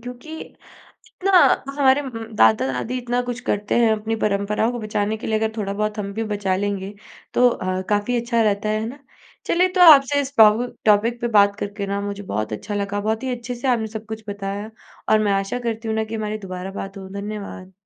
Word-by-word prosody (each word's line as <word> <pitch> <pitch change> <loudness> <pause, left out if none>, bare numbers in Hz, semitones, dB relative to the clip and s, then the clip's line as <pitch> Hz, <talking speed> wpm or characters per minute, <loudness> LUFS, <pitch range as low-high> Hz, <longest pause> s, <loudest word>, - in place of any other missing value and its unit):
क्योंकि 250 +7 -9 0.5
इतना 390 +1 -5 0.5
हमारे 270 0 +4
उम, 270 - -6 0.3
दादा-दादी 125 - +2
इतना 245 0 -1
कुछ 245 -1 -4
करते 205 0 0
हैं 230 -2 +4
अपनी 220 +1 -2
परंपराओं 210 +3 +1
को 240 - -5
बचाने 215 0 -2
के - - -7
लिए 220 0 +1
अगर 220 0 0
थोड़ा-बहुत 210 +1 -2
हम 200 -1 -4
भी 225 +2 -2
बचा 195 -2 0
लेंगे, 200 0 -3 0.4
तो 250 0 +5
अ, 185 -4 -2
काफ़ी 210 +4 +1
अच्छा 235 -1 0
रहता 210 -1 +1
है, 215 0 0
है 220 - -3
ना? 275 +4 -9 0.5
चलिए 360 +2 +3
तो 365 - +4
आपसे 285 0 +5
इस 280 +1 -7
टॉ 215 -1 +9 0.4
टॉपिक 225 +3 +3
पे 240 - 0
बात 200 -3 +4
करके 205 0 -4
ना 200 0 -2
मुझे 200 0 -5
बहुत 110 - -3
अच्छा 205 - -5
लगा 200 0 -2
बहुत 220 +4 -1
ही 260 - -2
अच्छे 240 +1 -6
से 240 +3 -4
आपने 230 -3 +1
सब 220 0 -8
कुछ 220 0 -7
बताया 200 +1 -5 0.4
और 215 - +5
मैं 210 -1 +1
आशा 195 +5 -1
करती 230 -1 -4
हूँ 220 - -1
ना 220 - +1
कि 220 +1 -6
हमारी 215 -1 -3
दोबारा 185 -1 -7
बात 195 0 -7
हो, 190 - -8
धन्यवाद। 200 -2 -7
215 Hz, 210 wpm, -22 LUFS, 200-235 Hz, 0.5 s, टॉ